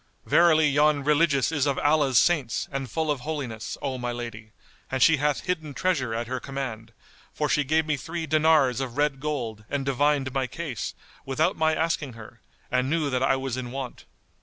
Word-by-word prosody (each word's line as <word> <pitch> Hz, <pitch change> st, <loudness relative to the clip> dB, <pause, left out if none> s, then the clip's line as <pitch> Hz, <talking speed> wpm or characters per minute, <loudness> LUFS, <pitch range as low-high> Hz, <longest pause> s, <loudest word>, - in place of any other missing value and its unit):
Verily 160 Hz, -3 st, +5 dB
yon 145 Hz, 0 st, +3 dB
Religious 150 Hz, -1 st, +3 dB
is 145 Hz, -3 st, +1 dB
of 140 Hz, -, 0 dB
Allah's 145 Hz, -4 st, +3 dB
saints 145 Hz, -9 st, +2 dB
and 135 Hz, -2 st, -4 dB
full 160 Hz, -2 st, -1 dB
of 145 Hz, -, -1 dB
holiness, 130 Hz, -6 st, -5 dB
O 130 Hz, -2 st, -2 dB
my 120 Hz, 0 st, -2 dB
lady, 115 Hz, -2 st, -7 dB, 0.4 s
and 130 Hz, -, -2 dB
she 160 Hz, +5 st, +6 dB
hath 145 Hz, 0 st, 0 dB
hidden 160 Hz, -6 st, -3 dB
treasure 135 Hz, -8 st, 0 dB
at 115 Hz, +1 st, -2 dB
her 130 Hz, +2 st, -3 dB
command, 125 Hz, -5 st, -6 dB, 0.4 s
for 150 Hz, -, -1 dB
she 145 Hz, +2 st, +2 dB
gave 155 Hz, +3 st, +1 dB
me 155 Hz, -2 st, 0 dB
three 165 Hz, +5 st, -5 dB
dinars 155 Hz, -5 st, +3 dB
of 130 Hz, -1 st, -5 dB
red 145 Hz, -2 st, +1 dB
gold 125 Hz, -8 st, -3 dB
and 140 Hz, -1 st, -2 dB
divined 140 Hz, 0 st, +1 dB
my 135 Hz, -2 st, 0 dB
case, 135 Hz, -, -5 dB, 0.3 s
without 135 Hz, +4 st, 0 dB
my 160 Hz, 0 st, +2 dB
asking 155 Hz, -5 st, -1 dB
her, 115 Hz, +1 st, -13 dB, 0.3 s
and 125 Hz, +1 st, +1 dB
knew 155 Hz, -2 st, 0 dB
that 125 Hz, 0 st, 0 dB
I 135 Hz, 0 st, +3 dB
was 130 Hz, -2 st, -3 dB
in 125 Hz, -1 st, -4 dB
want." 130 Hz, 0 st, -6 dB
140 Hz, 190 wpm, -26 LUFS, 125-155 Hz, 0.4 s, she